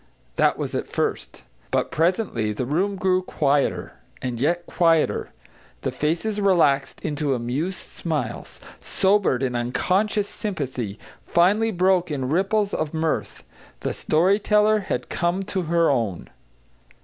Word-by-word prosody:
That -, -, +3 dB
was -, -, -4 dB
at -, -, -2 dB
first. -, -, -3 dB, 0.3 s
But -, -, 0 dB
presently 160 Hz, -, 0 dB
the 120 Hz, -, -3 dB
room 185 Hz, +9 st, 0 dB
grew 185 Hz, -1 st, +2 dB
quieter; 145 Hz, -5 st, 0 dB, 0.2 s
and 125 Hz, -2 st, -4 dB
yet 170 Hz, +4 st, +1 dB
quieter. 165 Hz, -3 st, +2 dB, 0.5 s
The -, -, -2 dB
faces 175 Hz, +8 st, -1 dB
relaxed 160 Hz, -9 st, +2 dB
into 145 Hz, -3 st, 0 dB
amused 135 Hz, +10 st, -3 dB
smiles, 150 Hz, -9 st, -4 dB, 0.2 s
sobered 190 Hz, -10 st, +2 dB
in 125 Hz, -2 st, -1 dB
unconscious 190 Hz, -, 0 dB
sympathy, 130 Hz, -, -4 dB, 0.3 s
finally 205 Hz, +6 st, +3 dB
broke 185 Hz, -2 st, +2 dB
in 135 Hz, -4 st, -2 dB
ripples 195 Hz, +5 st, +1 dB
of 155 Hz, +1 st, -2 dB
mirth. 160 Hz, 0 st, -2 dB, 0.4 s
The -, -, -2 dB
story 185 Hz, +6 st, +2 dB
teller 210 Hz, +1 st, +3 dB
had 195 Hz, -, -3 dB
come 175 Hz, +3 st, -1 dB
to 190 Hz, -1 st, -2 dB
her 170 Hz, -2 st, +3 dB
own. 110 Hz, -9 st, -2 dB
170 Hz, 130 wpm, -23 LUFS, 140-195 Hz, 0.5 s, That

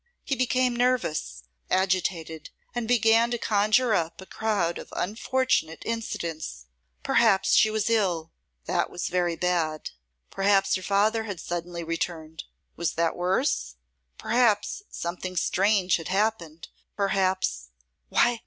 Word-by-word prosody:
He 275 Hz, -, -1 dB
became 255 Hz, -1 st, +1 dB
nervous, 190 Hz, -, 0 dB, 0.3 s
agitated, 180 Hz, -4 st, -1 dB, 0.2 s
and 240 Hz, -2 st, -3 dB
began 230 Hz, 0 st, +4 dB
to 240 Hz, -, -1 dB
conjure 215 Hz, +2 st, +2 dB
up 165 Hz, -4 st, -1 dB
a 190 Hz, -, -9 dB
crowd 200 Hz, -6 st, -1 dB
of -, -, -11 dB
unfortunate 215 Hz, -, 0 dB
incidents. 165 Hz, -, -4 dB, 0.4 s
Perhaps 190 Hz, -, +3 dB
she 220 Hz, -, +6 dB
was 215 Hz, 0 st, -1 dB
ill; 180 Hz, -8 st, +1 dB, 0.3 s
that -, -, 0 dB
was 175 Hz, -, -4 dB
very 175 Hz, -1 st, 0 dB
bad. 165 Hz, -3 st, -1 dB, 0.4 s
Perhaps 195 Hz, 0 st, +2 dB
her 185 Hz, -, 0 dB
father 210 Hz, +4 st, +1 dB
had 200 Hz, -5 st, -5 dB
suddenly 170 Hz, 0 st, -4 dB
returned. 160 Hz, -1 st, -4 dB, 0.3 s
Was 170 Hz, -3 st, -1 dB
that 165 Hz, 0 st, 0 dB
worse? 65 Hz, -, 0 dB, 0.4 s
Perhaps 230 Hz, -, +1 dB
something 180 Hz, +1 st, -5 dB
strange 195 Hz, 0 st, +2 dB
had 165 Hz, -, -7 dB
happened. 190 Hz, -5 st, -1 dB, 0.3 s
Perhaps 190 Hz, -, 0 dB, 0.4 s
Why! 240 Hz, -1 st, +3 dB
190 Hz, 125 wpm, -26 LUFS, 165-220 Hz, 0.4 s, she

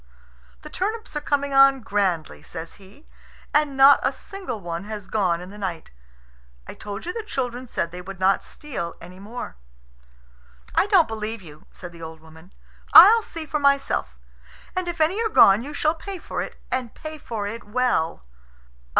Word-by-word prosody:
"The -, -, -9 dB
turnips 435 Hz, 0 st, -3 dB
are 295 Hz, -, -1 dB
coming 285 Hz, -1 st, -1 dB
on 270 Hz, 0 st, +6 dB
grandly," 195 Hz, -7 st, -1 dB
says 165 Hz, -1 st, -9 dB
he, 200 Hz, +11 st, -18 dB, 0.5 s
"and 295 Hz, -2 st, +2 dB
not 275 Hz, +1 st, +8 dB
a -, -, +1 dB
single 375 Hz, -, -7 dB
one 170 Hz, 0 st, -5 dB
has 210 Hz, -2 st, -7 dB
gone 180 Hz, -5 st, 0 dB
in 180 Hz, +2 st, -9 dB
the 210 Hz, -, -11 dB
night. 175 Hz, -5 st, -5 dB, 0.7 s
I -, -, -8 dB
told 205 Hz, +4 st, -7 dB
you 355 Hz, -, -3 dB
the 455 Hz, -, -3 dB
children 255 Hz, -, -4 dB
said 170 Hz, -7 st, -2 dB
they 180 Hz, +1 st, -7 dB
would 190 Hz, +1 st, -9 dB
not 190 Hz, +1 st, +3 dB
steal 250 Hz, -, -6 dB
any 180 Hz, +2 st, -12 dB
more." 210 Hz, -, -8 dB, 1.2 s
"I -, -, +3 dB
don't 385 Hz, -6 st, +5 dB
believe 220 Hz, -1 st, -5 dB
you," 155 Hz, -2 st, -14 dB
said 180 Hz, -2 st, -10 dB
the 170 Hz, -1 st, -14 dB
old 160 Hz, 0 st, -8 dB
woman. 160 Hz, +3 st, -17 dB, 0.4 s
"I'll 455 Hz, +2 st, +10 dB
see 330 Hz, -6 st, -7 dB
for 300 Hz, 0 st, -2 dB
myself. 280 Hz, -, +1 dB, 0.6 s
And 370 Hz, -1 st, -2 dB
if 345 Hz, -1 st, -4 dB
any 340 Hz, +8 st, +2 dB
are 450 Hz, -, 0 dB
gone, 200 Hz, -, +6 dB
you 280 Hz, +5 st, -7 dB
shall 305 Hz, +1 st, +1 dB
pay 385 Hz, +4 st, -7 dB
for -, -, -5 dB
it, -, -, -6 dB, 0.2 s
and 255 Hz, -3 st, -3 dB
pay 310 Hz, 0 st, -8 dB
for 220 Hz, -6 st, -5 dB
it 225 Hz, +3 st, -5 dB
well." 210 Hz, -, 0 dB
230 Hz, 180 wpm, -23 LUFS, 185-300 Hz, 1.2 s, I'll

